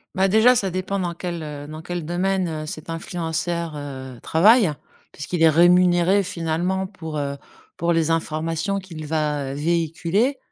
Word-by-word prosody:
Bah, 190 +1 +3
déjà, 220 +5 +5
ça 195 -4 -1
dépend 185 +2 -2
dans 175 -2 -2
quel, 170 -1 -5
heu, 145 -1 -7
dans 155 +1 -8
quel 175 0 -5
domaine, 185 +2 0
heu, 155 -1 -4
cet 155 +1 -8
influenceur, 165 -1 -3
heu, 130 -3 -7
travaille, 205 +4 +5 0.4
puisqu'il 160 +4 -4
est 165 - +7
rémunéré 175 +3 +5
finalement, 175 +2 -1
pour, 160 -5 -7
heu, 140 -1 -3 0.4
pour 170 +1 +1
les 165 -1 +1
informations 165 +4 -1
qu'il 165 -5 -9
va, 150 -3 -1
heu, - - -6
véhiculer. 170 - 0
170 Hz, 160 wpm, -22 LUFS, 155-185 Hz, 0.4 s, est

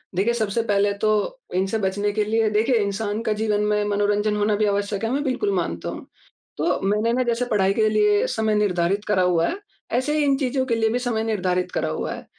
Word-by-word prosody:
देखिए, 200 +6 +1
सबसे 220 -1 0
पहले 205 -2 +2
तो 215 - 0 0.2
इनसे 190 +4 0
बचने 205 0 -1
के 215 0 +1
लिए 220 +1 +1
देखिए, 220 +4 +2
इंसान 205 +1 -2
का 220 - 0
जीवन 210 -1 +1
में 210 0 +1
मनोरंजन 205 +1 +1
होना 210 0 +1
भी 215 +1 +1
आवश्यक 200 0 -1
है, 225 - 0
मैं 280 +2 0
बिल्कुल 300 +10 -1
मानता - - -2
हूँ। - - -7 0.5
तो - - 0
मैंने 210 +4 +1
ना, 255 +1 +1
जैसे 240 0 0
पढ़ाई 195 -4 +1
के 215 +1 +2
लिए 210 -1 +3
समय 220 -1 0
निर्धारित 200 -1 0
करा 210 -3 +2
हुआ 170 -2 +2
है, 380 - -3 0.3
ऐसे 260 +5 0
ही 300 - +2
इन 280 -1 +3
चीज़ों 265 -1 -1
के 235 -3 0
लिए 225 -1 +1
भी 240 +3 0
समय 240 -3 -1
निर्धारित 185 -5 -1
करा - - -1
हुआ - - -3
है - - -9
210 Hz, 225 wpm, -23 LUFS, 205-230 Hz, 0.5 s, लिए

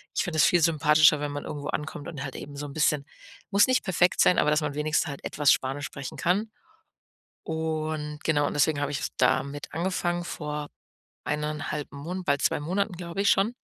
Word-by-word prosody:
ich - - +2
finde 165 -3 -3
das 130 - +7
viel 175 - +4
sympathischer, 155 -1 +5
wenn 145 0 -3
man 145 - -5
irgendwo 145 -1 -5
ankommt 150 -1 -4
und 140 -5 -6
halt 135 - -6
eben 145 0 -8
so 145 - -4
'n 140 - -9
bisschen 150 -2 +1 0.5
muss 200 +5 +5
nicht 255 0 +2
perfekt 180 -1 +2
sein, 180 - +5
aber 150 - +3
dass 150 +1 +2
man 150 -2 -2
wenigstens 150 +2 0
halt 140 -1 -7
etwas 145 -2 +3
Spanisch 135 +2 -2
sprechen 140 -2 -7
kann. 205 +6 0 0.9
Und, 155 -1 -3
genau 145 -2 +2
und - - -3
deswegen 145 0 +2
habe 145 0 -1
ich 145 - -1
jetzt - - -4
damit 145 +1 0
angefangen 175 0 -1
vor 150 -3 -5 0.6
1,5 150 0 -3
Mon 170 +7 -5
bald 140 -3 +1
2 - - +2
Monaten, 185 +6 -1
glaube 175 +2 -4
ich, 200 - +3
schon 205 +5 +3
150 Hz, 200 wpm, -27 LUFS, 145-175 Hz, 0.9 s, das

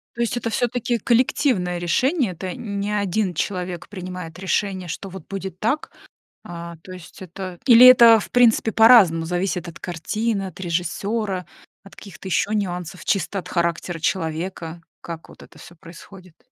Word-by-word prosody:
То 235 - -7
есть 235 +1 0
это 230 -1 -2
всё-таки 240 +1 -1
коллективное 230 -6 +1
решение, 250 - +1
это 180 +1 -6
не 200 -2 -4
один 205 -1 0
человек 180 0 -4
принимает 180 -4 -8
решение, 190 -1 -2
что 195 +3 -6
вот 190 -3 -10
будет 190 -2 -6
так, 235 +10 -1 0.6
а, 170 0 -8
то 185 - -11
есть 180 -2 -12
это 185 0 -8
или 245 -1 +9
это, 235 -3 +9
в - - -9
принципе, 230 -2 +3
по-разному 205 -9 +6
зависит 180 0 -2
от 170 - -10
картины, 200 +5 -3
от 185 -1 -10
режиссера, 185 +3 -2 0.4
от 195 - -16
каких-то 195 -1 -11
еще 200 +3 0
нюансов, 180 -3 -4
чисто 195 0 -1
от 180 - -7
характера 170 0 -2
человека, 165 0 -3 0.2
как 165 -1 -8
вот - - -15
это - - -16
всё 175 - -13
происходит? 180 +1 -15
190 Hz, 155 wpm, -22 LUFS, 175-215 Hz, 0.6 s, или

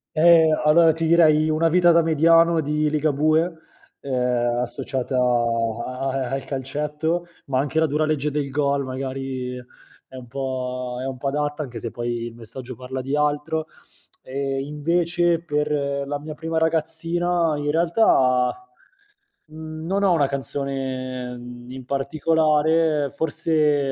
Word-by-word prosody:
Ehm, 160 -1 +5
allora, 160 +2 +6
ti 165 +1 -2
direi 155 -2 +4
“Una 160 +2 +2
vita 175 0 +5
da 170 - +5
mediano“ 165 +1 +4
di 150 0 0
Ligabue, 155 +1 +2 0.6
uhm, 125 -2 0
associata 130 +1 -3
a 120 +1 0
a 130 -1 -2
al 135 0 -3
calcetto, 150 +5 -2 0.2
ma 130 -1 0
anche 150 +3 -1
“La 160 - +4
dura 150 +2 0
legge 150 -1 -1
del 145 -2 -2
gol!“ 140 0 0
magari, 130 -1 -4 0.5
è 130 - -12
un 125 - -9
po' 125 -1 -4
è 130 - -4
un 135 -1 -4
po' 140 +2 -3
adatta, 150 +1 -2
anche 125 -4 -7
se, 115 0 -6
poi, 120 -1 -3
il 115 - -8
messaggio 125 +2 -8
parla 130 +2 -6
di 135 +2 -3
altro. 150 +2 0 0.5
E, 135 +1 -3
invece, 170 +3 0
per 150 -1 -1 0.3
la 145 +1 -3
mia 155 +1 -8
prima 160 +1 -3
ragazzina, 165 +1 +1
in 145 0 -2
realtà, 150 - +3 1.0
mhmm, 155 0 -8
non 195 +3 0
ho 190 - +4
una 145 -5 +2
canzone, 130 -2 -4
mhmm, 120 0 -11
in 130 -1 -8
particolare, 155 +1 +1
forse 150 -2 +1
145 Hz, 145 wpm, -23 LUFS, 130-160 Hz, 1.0 s, allora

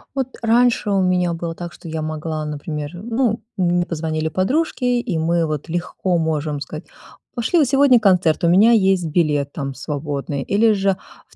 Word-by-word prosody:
Вот 260 -1 -3
раньше 235 -1 +3
у 195 -1 +2
меня 180 -2 +1
было 165 0 -5
так, 175 -1 -7
что - - -12
я 160 0 -3
могла, 155 0 -4
например, 150 0 -5
ну, 225 +4 -1 0.2
мне 175 -1 +2
позвонили 160 -1 -2
подружки, 255 - -1
и 240 -7 0
мы 165 +1 +1
вот 155 +1 -4
легко 175 +1 -1
можем 155 -2 -1
сказать: 155 +1 -7 0.5
"Пошли 245 +8 0
на 300 - +5
сегодня 270 -2 +5
концерт, 180 -5 +2
у - - +4
меня 200 +7 +6
есть 190 -4 +3
билет 150 -3 0
там 140 -2 -4
свободный", 140 0 -4
или 215 +2 +3
же 195 -1 +1 0.3
в - - -23
175 Hz, 175 wpm, -20 LUFS, 155-215 Hz, 0.5 s, меня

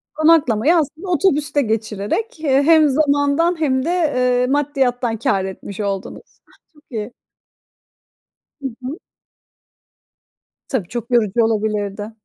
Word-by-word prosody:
Konaklamayı 310 -3 +3
aslında 320 +3 -2
otobüste 300 -4 +1
geçirerek, 220 - -2
eee, 280 -3 +2
hem 315 -1 +5
zamandan 285 +4 +1
hem 260 -4 +1
de, - - -1 0.3
eee, 250 0 +2
maddiyattan 265 -4 0
kâr 195 -3 0
etmiş 190 +1 -8
oldunuz. 200 -2 -5
Ah, - - -26
çok 300 -1 -23
iyi. 220 0 -4 1.5
Hı 275 - -2 0.2
hı. 280 +8 -5 1.7
Tabii, 220 -10 -2
çok 240 +4 -6
yorucu 230 -1 +2
olabilirdi. 210 -1 -2
260 Hz, 115 wpm, -19 LUFS, 220-300 Hz, 1.7 s, hem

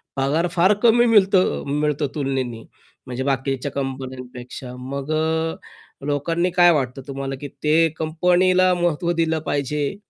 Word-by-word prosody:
पगार 145 +6 +1
फार 185 +3 +4
कमी 240 +1 +5
मिळतं 195 -4 +3 0.2
मिळतो 150 -1 0
तुलनेने. 130 -5 -2 0.4
म्हणजे 130 +1 -4
बाकीच्या 135 0 -1
कंपन्यांपेक्षा. 130 -2 -6
मग 140 +3 -5
अ, 160 +1 0 0.5
लोकांनी 165 +5 0
काय 175 0 +6
वाटतं 135 -3 -1
तुम्हाला, 135 0 -4
की 145 - -5 0.2
ते 160 +2 +4
कंपनीला 180 +3 +3
महत्त्व 175 -1 0
दिलं 160 -1 0
पाहिजे 145 +3 -1
150 Hz, 125 wpm, -22 LUFS, 135-175 Hz, 0.5 s, काय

